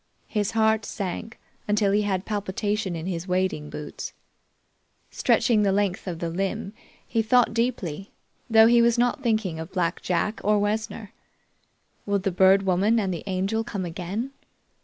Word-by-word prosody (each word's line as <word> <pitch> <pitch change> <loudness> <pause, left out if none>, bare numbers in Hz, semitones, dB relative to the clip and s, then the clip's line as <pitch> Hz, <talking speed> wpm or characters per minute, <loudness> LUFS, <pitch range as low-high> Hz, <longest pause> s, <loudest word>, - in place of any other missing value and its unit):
His 210 0 -2
heart 220 0 +3
sank 205 +3 -5 0.3
until 210 -1 +2
he 205 +1 +3
had 195 -2 -1
palpitation 205 -1 -2
in 160 0 -5
his 180 -1 -4
wading 180 -5 -1
boots. 150 0 -7 1.0
Stretching 225 -4 +2
the 200 -1 +3
length 200 -1 0
of 175 -3 -3
the 170 0 -3
limb, 195 +2 -3 0.3
he 230 - +1
thought 235 +1 +3
deeply, 200 -7 -2 0.4
though 220 -1 +7
he 235 +1 +6
was 235 0 +3
not 245 +2 +1
thinking 215 - 0
of 160 +2 -7
Black 170 -3 -1
Jack 185 +5 -1
or 210 +1 +3
Wessner. 210 0 -2 0.9
Would 200 -1 0
the 195 - +1
Bird 190 +2 +5
Woman 195 +5 +2
and 195 -3 -1
the 170 - -5
Angel 195 +4 0
come 200 -5 -4
again? 185 +9 -4
200 Hz, 160 wpm, -25 LUFS, 185-220 Hz, 1.0 s, though